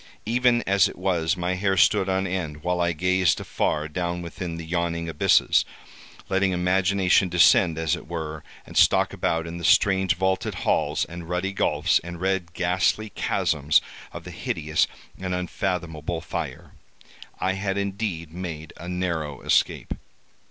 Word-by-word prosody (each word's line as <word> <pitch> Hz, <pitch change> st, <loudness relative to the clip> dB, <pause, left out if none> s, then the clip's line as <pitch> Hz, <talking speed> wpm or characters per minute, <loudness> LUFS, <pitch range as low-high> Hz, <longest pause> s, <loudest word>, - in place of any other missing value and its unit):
Even 120 Hz, +1 st, +2 dB
as 100 Hz, -1 st, +4 dB
it -, -, -11 dB
was, 90 Hz, -3 st, 0 dB
my 90 Hz, +1 st, -1 dB
hair 95 Hz, +1 st, 0 dB
stood 95 Hz, +2 st, +4 dB
on 95 Hz, 0 st, +1 dB
end, 80 Hz, -5 st, -4 dB
while 90 Hz, 0 st, 0 dB
I 85 Hz, 0 st, +2 dB
gazed 90 Hz, +2 st, +2 dB
afar 75 Hz, 0 st, -1 dB
down 85 Hz, +2 st, -3 dB
within 85 Hz, 0 st, -6 dB
the 85 Hz, -, -7 dB
yawning 85 Hz, 0 st, -2 dB
abysses, 80 Hz, -2 st, +3 dB, 0.6 s
letting 95 Hz, -1 st, +1 dB
imagination 90 Hz, +1 st, +2 dB
descend, 85 Hz, -1 st, +5 dB
as 80 Hz, -1 st, +1 dB
it -, -, -11 dB
were, 80 Hz, -2 st, -5 dB, 0.2 s
and -, -, -13 dB
stalk -, -, +4 dB
about 80 Hz, 0 st, -1 dB
in 85 Hz, +1 st, -6 dB
the -, -, -8 dB
strange 95 Hz, +2 st, +4 dB
vaulted 95 Hz, +1 st, -1 dB
halls, -, -, +1 dB
and 85 Hz, -1 st, -9 dB
ruddy 90 Hz, +2 st, -1 dB
gulfs, 85 Hz, -1 st, +2 dB
and 85 Hz, 0 st, -7 dB
red 95 Hz, -2 st, -1 dB
ghastly 95 Hz, +4 st, 0 dB
chasms 75 Hz, -3 st, +1 dB, 0.3 s
of -, -, -8 dB
the -, -, -9 dB
hideous 75 Hz, 0 st, 0 dB, 0.3 s
and 95 Hz, -1 st, -2 dB
unfathomable 85 Hz, -3 st, -3 dB
fire. -, -, -6 dB, 0.7 s
I 95 Hz, +1 st, 0 dB
had 95 Hz, 0 st, -2 dB
indeed 100 Hz, -5 st, -3 dB
made 80 Hz, -4 st, -6 dB
a 85 Hz, -, -8 dB
narrow 85 Hz, -6 st, -3 dB
escape. -, -, +1 dB
90 Hz, 150 wpm, -24 LUFS, 80-95 Hz, 0.7 s, descend